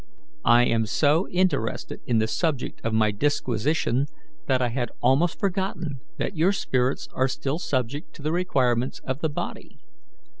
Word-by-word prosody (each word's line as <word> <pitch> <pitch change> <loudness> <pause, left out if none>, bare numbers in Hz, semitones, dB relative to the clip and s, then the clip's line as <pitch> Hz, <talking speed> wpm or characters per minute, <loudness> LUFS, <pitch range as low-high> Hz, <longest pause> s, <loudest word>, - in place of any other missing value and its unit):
I 120 +1 +7
am 115 -2 +1
so 155 - +2
interested 180 -11 0
in 120 - +2
the 110 - +3
subject 145 +2 -1
of 115 - 0
my 110 -1 +3
disquisition 135 +2 0 0.4
that 130 - +3
I 125 -1 +1
had 120 -1 -2
almost 140 +8 +2
forgotten 190 - -2 0.2
that - - -2
your 170 +5 +3
spirits 130 -8 0
are 130 - +2
still 135 +3 -2
subject 135 0 -2
to 145 - -11
the 155 - 0
requirements 130 -8 +1
of 130 +1 -2
the 160 - 0
body. 145 - -6
135 Hz, 155 wpm, -25 LUFS, 120-160 Hz, 0.4 s, I